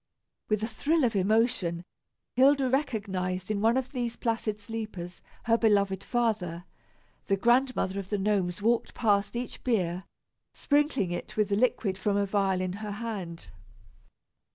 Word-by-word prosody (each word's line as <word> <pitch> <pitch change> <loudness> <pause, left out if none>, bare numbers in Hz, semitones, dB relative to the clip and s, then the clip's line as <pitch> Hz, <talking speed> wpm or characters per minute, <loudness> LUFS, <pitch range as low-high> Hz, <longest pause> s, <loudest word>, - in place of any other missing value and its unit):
With 215 0 +1
a - - 0
thrill 295 +7 +1
of 235 -3 +2
emotion, 195 -4 +1 0.5
Hilda 270 +1 +4
recognized 200 - -1
in 205 -1 -1
one 225 +3 +4
of 260 0 -2
these 240 -3 -2
placid 225 -2 -2
sleepers 205 -5 -6 0.2
her 230 0 +3
beloved 200 -3 +2
father. 200 -9 -1 0.6
The 195 - +2
Grandmother 240 -4 +2
of 195 -1 -7
the 205 - 0
Gnomes 195 -2 0
walked 235 +1 +1
past 205 -2 +1
each 245 +1 -5
bier, 185 -7 0 0.5
sprinkling 285 - +1
it 175 - -5
with 215 -1 +2
the 200 - +2
liquid 205 -4 +1
from 200 +1 +1
a 200 - +2
vial 195 -2 +1
in 185 -1 -2
her 210 -1 -4
hand. 195 - -6
210 Hz, 150 wpm, -28 LUFS, 190-235 Hz, 0.6 s, Hilda